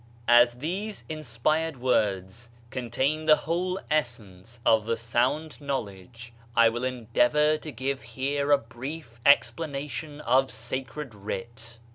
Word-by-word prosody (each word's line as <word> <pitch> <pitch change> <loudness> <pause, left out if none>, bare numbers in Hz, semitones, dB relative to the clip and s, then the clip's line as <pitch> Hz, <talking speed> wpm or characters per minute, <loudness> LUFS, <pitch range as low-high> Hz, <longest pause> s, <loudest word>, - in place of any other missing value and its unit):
As 120 0 +6
these 190 - -4
inspired 155 +2 -1
words 110 -2 0 0.2
contain 130 +5 -1
the 155 -1 +7
whole 180 +5 -2
essence 115 -6 -3
of 110 -1 +4
the 115 0 0
sound 125 +8 -1
knowledge, 115 -3 -5 0.2
I 115 -1 +6
will 120 +2 -4
endeavor 130 +5 +2
to 155 - -7
give 130 +1 -3
here 140 +5 -2
a 145 - +7
brief 120 +1 -8
explanation 145 0 +1
of 130 +1 +3
sacred 130 +3 -5
writ. 115 +3 -7
125 Hz, 120 wpm, -27 LUFS, 115-150 Hz, 0.2 s, the